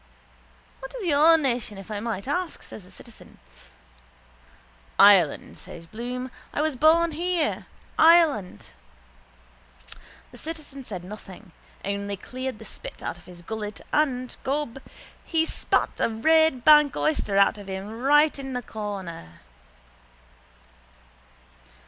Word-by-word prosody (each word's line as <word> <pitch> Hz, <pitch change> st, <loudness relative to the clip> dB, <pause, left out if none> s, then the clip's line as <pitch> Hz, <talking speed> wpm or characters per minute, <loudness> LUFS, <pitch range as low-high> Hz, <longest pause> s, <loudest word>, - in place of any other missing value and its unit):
—What 265 Hz, -, -9 dB
is -, -, -6 dB
your 320 Hz, +1 st, +5 dB
nation 245 Hz, -8 st, -2 dB
if 195 Hz, +2 st, -10 dB
I 210 Hz, -, -3 dB
may 215 Hz, -3 st, -4 dB
ask? 350 Hz, +5 st, -3 dB
says 200 Hz, -, -11 dB
the -, -, -17 dB
citizen. 225 Hz, +4 st, -15 dB, 1.6 s
—Ireland, 195 Hz, -7 st, +5 dB
says 165 Hz, -, -11 dB
Bloom. 245 Hz, +6 st, -6 dB, 0.2 s
I -, -, -4 dB
was 310 Hz, -3 st, -1 dB
born 325 Hz, +4 st, +4 dB
here. 340 Hz, 0 st, -1 dB, 0.3 s
Ireland. 315 Hz, -, +4 dB, 1.6 s
The -, -, -12 dB
citizen 305 Hz, -4 st, -7 dB
said 185 Hz, -6 st, -6 dB
nothing 195 Hz, -1 st, -11 dB, 0.3 s
only 200 Hz, 0 st, -3 dB
cleared 255 Hz, +3 st, -6 dB
the 220 Hz, -, -12 dB
spit -, -, -10 dB
out 175 Hz, -, -5 dB
of -, -, -20 dB
his 175 Hz, -1 st, -13 dB
gullet 215 Hz, +1 st, -5 dB
and, 255 Hz, -5 st, 0 dB
gob, 270 Hz, -2 st, -2 dB, 0.4 s
he 320 Hz, -1 st, +1 dB
spat -, -, -1 dB
a -, -, +2 dB
Red 290 Hz, +3 st, +3 dB
bank 300 Hz, -2 st, +7 dB
oyster 250 Hz, -10 st, 0 dB
out 200 Hz, +1 st, +4 dB
of 200 Hz, -, -11 dB
him 200 Hz, +4 st, -6 dB
right 295 Hz, +2 st, +4 dB
in 270 Hz, -1 st, -6 dB
the 250 Hz, 0 st, -3 dB
corner. 190 Hz, -, -7 dB
245 Hz, 125 wpm, -25 LUFS, 200-300 Hz, 1.6 s, bank